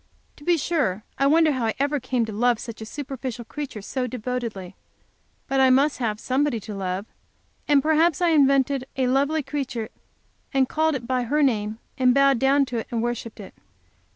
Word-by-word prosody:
To 290 - -15
be 345 +2 +3
sure 275 - -1 0.2
I 275 - +4
wonder 315 +1 +4
how 255 -5 -1
I 220 - -1
ever 285 +1 0
came 255 -2 -1
to 220 - -6
love 240 +2 +2
such 225 0 -8
a 220 - -6
superficial 260 -3 -6
character 270 -6 -6
so 255 +3 -2
devotedly, 235 -6 -5 0.7
but 270 - 0
I 265 -1 +6
must 275 +3 +3
have 215 -4 -1
somebody 265 -1 0
to 210 - -7
love, 190 0 -3 0.6
and 285 -2 +4
perhaps 315 0 +3
I 350 -1 +3
invented 275 -3 +3
a 260 - +2
lovely 280 +4 +1
creature, 255 -6 -4 0.7
and 265 -1 +3
called 315 +1 +1
it 250 -3 -5
by 255 0 0
her 295 +5 +1
name, 215 -5 0 0.2
and 250 -1 +4
bowed 275 -2 +4
down 275 +2 +3
to 245 -3 -3
it - - -6
and 230 -1 -2
worshiped 235 -2 -4
it. 200 - -10
260 Hz, 190 wpm, -24 LUFS, 230-285 Hz, 0.7 s, I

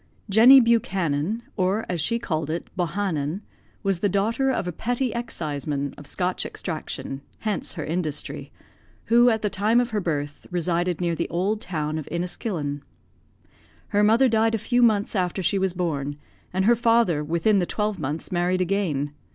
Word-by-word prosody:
Jenny 240 +6 +9
Buchanan, 200 - +1
or 195 +3 0
as 175 -3 -1
she 230 +9 +1
called 160 -9 -2
it, 165 +2 -4
Bohanon, 175 -2 -1 0.4
was 195 -3 0
the 205 - +1
daughter 225 +8 +1
of 240 -8 -1
a - - -1
petty 245 +7 -1
exciseman, 145 - -3
of 145 - -11
Scotch 180 0 -1
extraction 155 -4 -5 0.2
(hence 210 -4 -2
her - - -5
industry) 155 -2 -4 0.6
who, 240 +1 +7
at 220 -2 0
the 210 - +1
time 210 +5 +2
of 245 -1 0
her 210 -1 0
birth, 145 -4 -3
resided 175 0 -1
near 170 -1 +1
the 170 +1 -2
old 200 +5 -1
town 155 -3 -2
of 150 - -8
Inniskillen. 170 -4 -3 1.1
Her 205 -1 +2
mother 225 +5 +5
died 225 -1 +2
a - - +1
few 245 +3 +1
months 215 -3 +3
after 185 0 0
she 195 +3 +2
was 190 -1 +1
born; 145 -5 -2 0.3
and 190 +1 0
her 240 +2 +6
father, 230 -9 +3
within 170 +7 +2
the 175 - 0
twelve 210 -2 -2
months, 150 +5 -4
married 180 +1 +1
again. 170 -7 -1
185 Hz, 165 wpm, -24 LUFS, 160-220 Hz, 1.1 s, Jenny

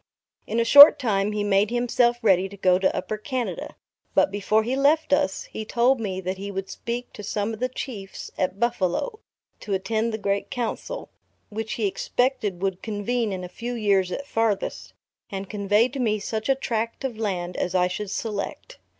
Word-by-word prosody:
In 225 - -1
a 230 - +2
short 285 +4 +11
time 210 -6 0
he 210 -1 -1
made 205 0 +3
himself 240 0 +2
ready 190 -2 +3
to 200 - -11
go 185 -1 +3
to 190 - +1
Upper 215 - -3
Canada; 255 +1 -4 0.4
but - - +4
before 205 +2 +1
he 245 +4 -1
left 285 +2 +3
us, 285 -9 +1
he 220 - -7
told 240 +4 +2
me 195 -4 -3
that 190 +1 -4
he 200 +1 -5
would 195 -1 -5
speak 240 +1 -5
to - - -8
some 210 +2 -2
of 220 - -7
the 255 +1 0
Chiefs 215 -7 -7
at 185 +1 -2
Buffalo, 235 - 0 0.4
to 200 -3 -2
attend 220 +4 -1
the 220 - -2
great 200 -1 -1
Council, 245 - -4 0.4
which 220 +1 -4
he 220 - -1
expected 210 -2 -1
would 190 -2 -1
convene 220 +1 -1
in 185 -1 -4
a - - -5
few 240 +7 -5
years 200 -5 +2
at 280 - -4
farthest, 225 -6 -1 0.4
and 195 -1 -6
convey 210 +2 +2
to 275 +2 -6
me 220 -4 +1
such 220 +3 -4
a 270 - +5
tract 230 -2 -3
of 245 -5 -4
land 180 -5 -2
as 180 - -2
I 180 -1 +4
should 195 +2 -4
select. 215 - -5
215 Hz, 195 wpm, -24 LUFS, 195-240 Hz, 0.4 s, short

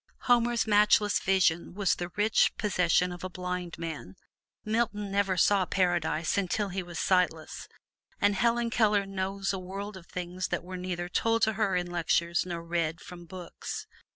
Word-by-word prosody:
Homer's 240 -1 +3
matchless 210 -1 +4
vision 180 -3 +1
was 200 -2 +2
the 175 0 -4
rich 210 +1 +3
possession 180 -3 +2
of 175 0 -8
a 185 - -3
blind 180 -1 -5
man; 160 - -6 0.5
Milton 215 -2 -1
never 195 -2 +1
saw 195 +2 +4
Paradise 175 -2 +1
until 200 +2 -1
he 190 +1 -3
was 175 -2 -8
sightless, 175 -4 0 0.5
and 205 0 +3
Helen 235 +3 +1
Keller 210 -3 +3
knows 195 0 -2
a 190 - -3
world 195 +3 -6
of 180 -2 -12
things 180 +1 -4
that 175 - -2
were 185 +1 -7
neither 180 -1 -4
told 225 +4 +1
to 220 - +3
her 210 -3 0
in 180 0 0
lectures 170 0 0
nor 170 -2 -4
read 170 -1 -1
from 175 -1 -11
books. 180 0 -7
185 Hz, 165 wpm, -29 LUFS, 175-205 Hz, 0.5 s, matchless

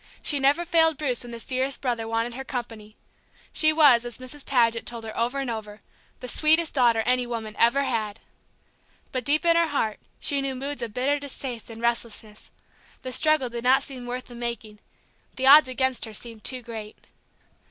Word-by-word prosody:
She 290 - +1
never 285 +6 +2
failed 325 -2 +3
Bruce 255 -6 -1
when 240 - -10
this 235 -1 -8
dearest 265 +1 -1
brother 235 -4 -2
wanted 230 +1 -1
her 265 +2 -6
company; 225 -5 -7 0.6
she 310 0 +5
was, 290 -7 +6
as 240 -2 -5
Mrs. 255 +3 -6
Paget 230 -3 +2
told 235 -1 -5
her 220 -1 -7
over 240 +4 -1
and 275 -1 -2
over, 220 -2 -6 0.4
"the 250 - -6
sweetest 315 +5 +3
daughter 235 -4 +3
any 250 +1 +1
woman 225 -2 -5
ever 270 +4 +4
had." 225 -5 -2 0.9
But 255 -1 -2
deep 300 +6 +1
in 335 0 +5
her 335 0 +3
heart 225 -8 -1 0.2
she 280 -1 0
knew 270 -1 -3
moods 275 +1 -5
of 235 -2 -4
bitter 280 +3 +1
distaste 260 -5 -5
and 225 0 -10
restlessness. 230 -2 -3 0.5
The 255 - -4
struggle 310 -2 +2
did 235 0 -6
not 260 +2 +4
seem 255 -3 -9
worth 250 +1 -5
the 245 - -13
making; 235 -3 -6 0.6
the 260 - -2
odds 285 +1 +9
against 260 -1 -1
her 220 -1 -9
seemed 225 0 -7
too 255 -2 0
great. 220 -2 -8
250 Hz, 190 wpm, -25 LUFS, 230-275 Hz, 0.9 s, odds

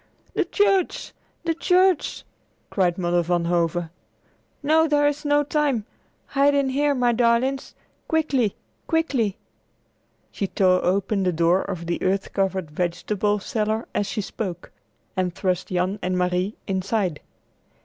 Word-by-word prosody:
"The - - +1
church! 395 -3 +1 0.3
the 335 -1 +1
church!" 365 0 +2 0.5
cried 180 -3 +1
Mother 175 -1 +1
Van 175 0 0
Hove. 170 0 +1 0.8
"No, 320 +2 +4
there 290 -1 +3
is 290 0 -1
not 290 0 +2
time. 285 -8 +1 0.4
Hide 285 0 +3
in 280 -1 +2
here, 285 +2 +1
my 245 -2 +3
darlings. 240 +3 +1 0.3
Quickly! 280 -9 +1 0.3
Quickly!" 270 - 0 0.9
She 200 - -2
tore 185 -1 +2
open 195 +2 +1
the 185 -1 +2
door 170 +3 +3
of 180 -4 -5
the 170 0 -2
earth 195 +1 0
covered 190 -5 -1
vegetable 185 +5 -1
cellar 220 0 -2
as 205 - 0
she 210 +2 -2
spoke, 185 -3 -5 0.4
and 180 -2 -1
thrust 185 -2 -1
Jan 185 +3 -1
and 180 0 -1
Marie 180 +3 0
inside. 190 -3 -1
205 Hz, 135 wpm, -24 LUFS, 180-280 Hz, 0.9 s, No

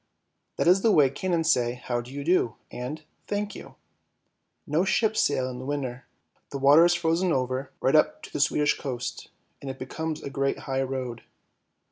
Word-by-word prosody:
That - - 0
is 185 +2 +5
the 225 - +4
way 145 -7 +5
cannons 165 -1 +1
say 120 -4 +1
" 125 - -14
how 120 -1 -1
do 120 +2 -12
you 140 +1 -5
do 160 -8 +2
" - - -43
and 130 +6 -6
" - - -42
thank 205 0 -2
you." 135 -1 -11 0.9
No 155 +4 +1
ships 215 +3 +2
sail 130 -3 +1
in 125 -1 -6
the 130 - -7
winter, 135 -3 -4 0.4
the 140 - -4
water 140 +4 +7
is 175 0 +4
frozen 170 +2 +1
over, 130 0 -1
right 135 - +3
up 155 - +3
to - - -11
the - - -2
Swedish 145 +1 +2
coast, 125 -3 -5 0.3
and 140 - -6
it 130 - -6
becomes 155 +4 -5
a 140 - -5
great 135 0 0
high 135 0 -1
road. 130 -3 -4
140 Hz, 200 wpm, -26 LUFS, 130-165 Hz, 0.9 s, water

